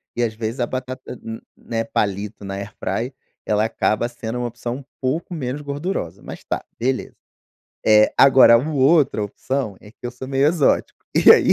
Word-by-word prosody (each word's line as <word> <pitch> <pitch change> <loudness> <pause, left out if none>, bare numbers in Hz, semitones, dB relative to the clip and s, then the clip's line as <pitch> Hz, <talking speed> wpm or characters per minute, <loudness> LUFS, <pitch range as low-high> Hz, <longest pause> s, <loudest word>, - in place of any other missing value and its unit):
e, 120 - +1
às 110 - 0
vezes, 110 +3 -4
a 120 - +2
batata 130 0 -5 0.2
n 115 0 -6 0.2
né 115 -1 -3
palito 105 -1 -2
na 95 0 -4
AirFryer, 100 +4 -4 0.3
ela 105 0 +2
acaba 110 0 0
sendo 120 0 -5
uma 120 - -1
opção 120 +1 -5
um 140 - -10 0.2
pouco 145 +7 -2
menos 140 -2 -3
gordurosa, 140 - -4
mas - - -9
tá, - - -3 0.2
beleza. 130 +2 -1 0.7
Eh, 105 0 +6
agora 130 -3 +8
um 155 +6 -3
outro 135 -4 +4
opção 125 0 -3
é 105 - -14
que - - -28
eu 120 - -3
sou 125 +2 -8
meio 135 +1 +2
exótico 155 -2 +2 0.2
e - - +7
aí. - - +7
120 Hz, 180 wpm, -21 LUFS, 110-135 Hz, 0.7 s, agora